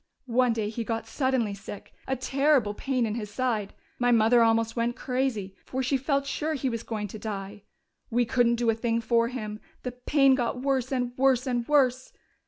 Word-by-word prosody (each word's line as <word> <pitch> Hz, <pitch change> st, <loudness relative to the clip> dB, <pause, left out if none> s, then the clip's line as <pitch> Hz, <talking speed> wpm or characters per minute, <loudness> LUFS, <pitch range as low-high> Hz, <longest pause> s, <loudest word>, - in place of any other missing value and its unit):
"One 250 Hz, 0 st, +2 dB
day 220 Hz, -2 st, -2 dB
he 230 Hz, +1 st, -4 dB
got 225 Hz, 0 st, -3 dB
suddenly 255 Hz, -3 st, 0 dB
sick. 200 Hz, 0 st, -9 dB
A 265 Hz, -, 0 dB
terrible 270 Hz, -4 st, +2 dB
pain 255 Hz, +2 st, -1 dB
in 215 Hz, -, -2 dB
his 215 Hz, -2 st, -4 dB
side. 215 Hz, -3 st, -1 dB, 0.3 s
My 245 Hz, 0 st, +2 dB
mother 230 Hz, +1 st, +5 dB
almost 225 Hz, 0 st, +2 dB
went 235 Hz, 0 st, 0 dB
crazy, 250 Hz, -8 st, -2 dB
for 260 Hz, +1 st, -3 dB
she 260 Hz, +2 st, +1 dB
felt 275 Hz, +1 st, 0 dB
sure 310 Hz, +2 st, -2 dB
he 265 Hz, -2 st, -1 dB
was 230 Hz, -1 st, -3 dB
going 215 Hz, -3 st, -4 dB
to 215 Hz, -, -8 dB
die. 205 Hz, -1 st, -6 dB, 0.4 s
We 240 Hz, +1 st, +2 dB
couldn't 235 Hz, 0 st, +3 dB
do 235 Hz, -1 st, +2 dB
a -, -, 0 dB
thing 230 Hz, +1 st, 0 dB
for 230 Hz, 0 st, +2 dB
him; 215 Hz, -4 st, -5 dB, 0.2 s
the 250 Hz, -, -3 dB
pain 270 Hz, +2 st, +3 dB
got 250 Hz, -1 st, -1 dB
worse 265 Hz, -2 st, 0 dB
and 245 Hz, -2 st, -1 dB
worse 260 Hz, -1 st, +3 dB
and 245 Hz, -2 st, -1 dB
worse. 260 Hz, -3 st, +2 dB
240 Hz, 195 wpm, -27 LUFS, 225-260 Hz, 0.4 s, mother